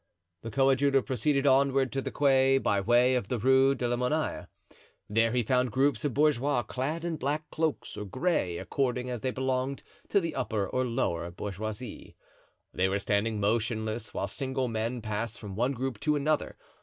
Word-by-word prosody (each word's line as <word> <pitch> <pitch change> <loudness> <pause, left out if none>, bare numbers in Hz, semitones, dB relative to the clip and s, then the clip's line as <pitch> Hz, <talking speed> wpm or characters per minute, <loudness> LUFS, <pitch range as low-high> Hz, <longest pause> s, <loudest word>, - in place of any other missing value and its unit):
The 115 - -6
coadjutor 135 +2 +3
proceeded 135 +3 0
onward 135 -1 +3
to 135 - -1
the - - -3
quay 135 -1 +4
by 100 -6 +1
way 120 +4 +4
of 125 -6 0
the 125 - -1
Rue 130 +4 +4
de 125 -2 -1
la 120 - +1
Monnaie; 150 +6 -1 0.6
there 115 +2 +2
he 125 0 +1
found 125 +1 +1
groups 135 0 +1
of 145 -5 -1
bourgeois 145 -3 +2
clad 145 +9 -3
in 165 -2 -2
black 150 +3 -2
cloaks 160 -2 -2
or 105 - -5
gray, 115 - 0
according 125 +1 -1
as 120 -3 -4
they 130 - 0
belonged 130 +1 -2 0.3
to 200 - +4
the 165 -4 -3
upper 110 -6 -1
or 130 +5 -1
lower 85 -7 -1
bourgeoisie. 105 +5 -6 0.6
They 95 +1 +1
were 100 - +1
standing 105 +2 0
motionless, 110 +1 -1
while - - -2
single 130 +4 -2
men 115 +1 -2
passed 110 +1 -3
from 100 -3 -8
one 125 +6 +1
group 130 -3 -3
to 150 +4 +1
another. 150 +1 0
125 Hz, 180 wpm, -29 LUFS, 110-135 Hz, 0.6 s, quay